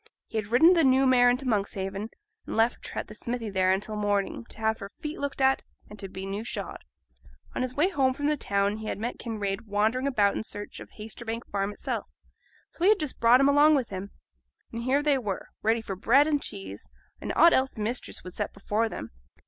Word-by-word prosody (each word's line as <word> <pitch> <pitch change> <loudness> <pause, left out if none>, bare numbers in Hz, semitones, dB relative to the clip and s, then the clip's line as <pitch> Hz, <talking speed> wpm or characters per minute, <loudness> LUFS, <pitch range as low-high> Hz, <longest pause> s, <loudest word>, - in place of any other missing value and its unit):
He 225 - -3
had 210 - -5
ridden 260 - +6
the 335 -2 +4
new 265 0 +5
mare 250 -1 +6
into 250 +2 0
Monkshaven, 200 -1 -2 0.4
and - - -4
left 225 +2 +1
her - - -4
at - - -5
the - - -10
smithy 230 0 -4
there 185 -1 +2
until 205 +3 -1
morning, 205 +1 -1
to - - -11
have 220 0 0
her 200 -2 -7
feet 300 +1 -5
looked 280 -1 -3
at, 265 0 +4 0.3
and 210 - -11
to 195 -1 -5
be 190 +1 -7
new 200 +2 -4
shod. 235 - -4 0.7
On - - -2
his 255 0 -2
way 345 +7 +2
from 270 -2 +1
the 300 +1 +3
town 200 -5 0
he 220 0 -7
had - - -2
met 230 +4 -4
Kinraid 215 -1 -3
wandering 220 +6 +1
about 205 -7 +2
in - - -2
search 205 -1 -7
of - - -10
Haytersbank 225 +2 -6
Farm 200 0 -1
itself, 205 - -4 0.6
so 340 - -6
he 380 - +6
had 430 - +5
just 305 -4 -3
brought 240 +3 +6
him 275 - +5
along 295 +2 +6
with 260 -5 0
him; 195 +1 -5 0.6
and 230 - -4
here 265 +4 +1
they 290 -2 +3
were, 205 -6 -4
ready 225 +1 +2
for 195 -3 -5
bread 255 +9 +4
and 295 -2 +1
cheese, 195 -2 -7 0.3
and - - -3
aught 335 0 +7
else 265 0 +3
the 220 - -9
mistress 235 +4 -4
would 180 - -9
set - - -3
before 210 +3 0
them. - - -7
225 Hz, 225 wpm, -27 LUFS, 205-265 Hz, 0.7 s, aught